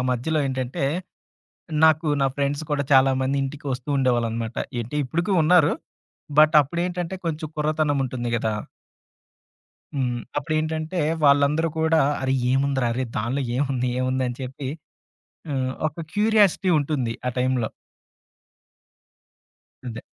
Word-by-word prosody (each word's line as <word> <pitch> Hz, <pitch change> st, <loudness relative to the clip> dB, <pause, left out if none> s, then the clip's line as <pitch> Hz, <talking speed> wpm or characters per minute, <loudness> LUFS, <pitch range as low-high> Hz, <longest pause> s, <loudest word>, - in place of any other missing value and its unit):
మధ్యలో 150 Hz, +6 st, 0 dB
ఏంటంటే, 130 Hz, 0 st, -2 dB, 1.0 s
నాకు 155 Hz, 0 st, +3 dB
నా 135 Hz, -, +4 dB
ఫ్రెండ్స్ 140 Hz, +2 st, -1 dB
కూడా 145 Hz, -1 st, +1 dB
చాలామంది 130 Hz, +1 st, +3 dB
ఇంటికి 145 Hz, +1 st, -6 dB
వస్తూ 130 Hz, +3 st, -6 dB
ఉండేవాళ్ళనమాట. 115 Hz, -3 st, 0 dB, 0.2 s
ఏటి 120 Hz, +6 st, -5 dB
ఇప్పటికి 170 Hz, +9 st, -1 dB
ఉన్నారు. 160 Hz, -1 st, +5 dB, 0.7 s
బట్ 155 Hz, 0 st, +6 dB
అప్పుడేంటంటే 175 Hz, +4 st, -3 dB
కొంచెం 160 Hz, -1 st, -2 dB
కుర్రతనం 150 Hz, -1 st, +1 dB
ఉంటుంది 120 Hz, -1 st, -4 dB
కదా! 110 Hz, -1 st, -1 dB, 1.4 s
హ్మ్. 125 Hz, -3 st, -1 dB, 0.2 s
అప్పుడేంటంటే, 155 Hz, +3 st, -2 dB, 0.2 s
వాళ్ళందరూ 145 Hz, +3 st, +4 dB
కూడా 160 Hz, 0 st, +3 dB, 0.2 s
"అరే! 130 Hz, 0 st, +1 dB, 0.2 s
ఏముందిరా, 135 Hz, -2 st, +1 dB
అరే! 130 Hz, +2 st, -1 dB
దాన్లో 125 Hz, +6 st, -1 dB
ఏముంది, 130 Hz, -2 st, 0 dB
ఏముంది" 130 Hz, 0 st, 0 dB
అని 125 Hz, +1 st, -6 dB
చెప్పి, 130 Hz, +1 st, -5 dB, 0.8 s
హ్మ్. 130 Hz, -2 st, -1 dB, 0.2 s
ఒక 160 Hz, +2 st, -8 dB
క్యూరియాసిటీ 210 Hz, -3 st, +3 dB
ఉంటుంది 135 Hz, -6 st, -1 dB
ఆ -, -, 0 dB
టైంలో. 125 Hz, -3 st, +1 dB, 2.2 s
అదే. 120 Hz, -2 st, -6 dB
140 Hz, 115 wpm, -24 LUFS, 130-155 Hz, 2.2 s, బట్